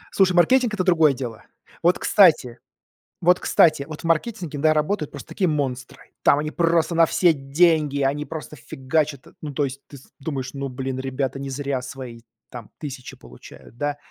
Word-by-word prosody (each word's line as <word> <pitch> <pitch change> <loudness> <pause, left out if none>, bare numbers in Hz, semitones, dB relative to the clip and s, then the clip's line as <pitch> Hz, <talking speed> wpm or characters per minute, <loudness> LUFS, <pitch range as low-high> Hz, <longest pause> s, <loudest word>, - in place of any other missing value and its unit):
Слушай, 190 -2 +4
маркетинг- 240 +7 +4
это 185 - 0
другое 165 -5 +4
дело. 120 -4 -7 0.4
Вот, 175 +2 +3
кстати, 155 - +4 0.6
вот, 180 +1 +4
кстати, 155 -4 +3
вот 155 -1 -8
в - - -18
маркетинге, 165 -2 -1
да, 155 +1 +4
работают 155 +1 -1
просто - - -10
такие 185 - 0
монстры. 135 -5 -4
Там 140 - +5
они 155 +1 -3
просто 170 0 +1
на 165 0 +5
все 175 +1 +3
деньги, 145 0 +1
они 145 +2 0
просто 155 -2 -8
фигачат. 140 +2 -2
Ну, 150 -2 -6
то 145 - 0
есть 135 0 -4
ты 140 - -13
с 130 - -19
думаешь: 135 -3 -5
"Ну, 140 0 -4
блин, 130 0 -5
ребята 135 0 -3
не 135 0 -5
зря 135 -1 -3
свои 125 -2 -8 0.3
там 120 -4 -9
тысячи 135 -4 -8
получают, 115 - -15
да". 145 +2 -2
145 Hz, 180 wpm, -23 LUFS, 135-165 Hz, 0.6 s, Там